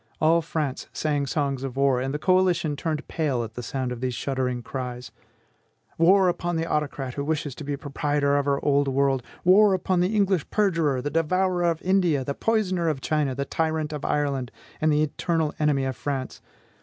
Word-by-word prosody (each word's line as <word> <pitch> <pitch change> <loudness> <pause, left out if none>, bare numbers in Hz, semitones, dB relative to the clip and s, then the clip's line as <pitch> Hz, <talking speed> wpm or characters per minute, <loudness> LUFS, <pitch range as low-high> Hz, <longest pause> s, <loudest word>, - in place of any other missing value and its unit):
All 165 +2 +4
France 150 -4 -3
sang 145 -2 -1
songs 140 -2 -1
of 135 -1 -5
war, 135 -2 +3
and 135 +1 -2
the 150 - -2
coalition 180 -3 +2
turned 155 +1 -3
pale 140 -7 -1
at 110 -1 -8
the 125 - -6
sound 130 +2 -3
of 125 -1 -6
these 130 -2 -2
shuddering 125 -2 -2
cries: 125 0 -6 0.9
"War 185 +3 +5
upon 175 0 -1
the 165 0 -1
autocrat, 145 -5 -2
who 140 - -3
wishes 150 -2 -2
to 150 - -9
be 145 0 -3
proprietor 145 0 0
of 145 -1 +1
the 140 -1 +1
old 145 -1 +2
world! 135 -1 +1 0.2
War 195 +2 +6
upon 185 0 0
the 185 +5 +1
English 195 -5 +1
perjurer, 165 -11 +1
the 145 - -2
devourer 175 +3 +1
of 170 -1 0
India, 180 -7 +2
the 140 - -3
poisoner 185 -4 0
of 150 -4 -2
China, 145 -2 0
the 140 +1 -2
tyrant 155 0 -1
of 150 -1 -5
Ireland, 140 -4 -1 0.3
and 155 0 +3
the 150 +1 +3
eternal 160 0 -1
enemy 145 -3 +2
of 130 -1 -2
France! 130 +2 -4
150 Hz, 195 wpm, -25 LUFS, 135-165 Hz, 0.9 s, War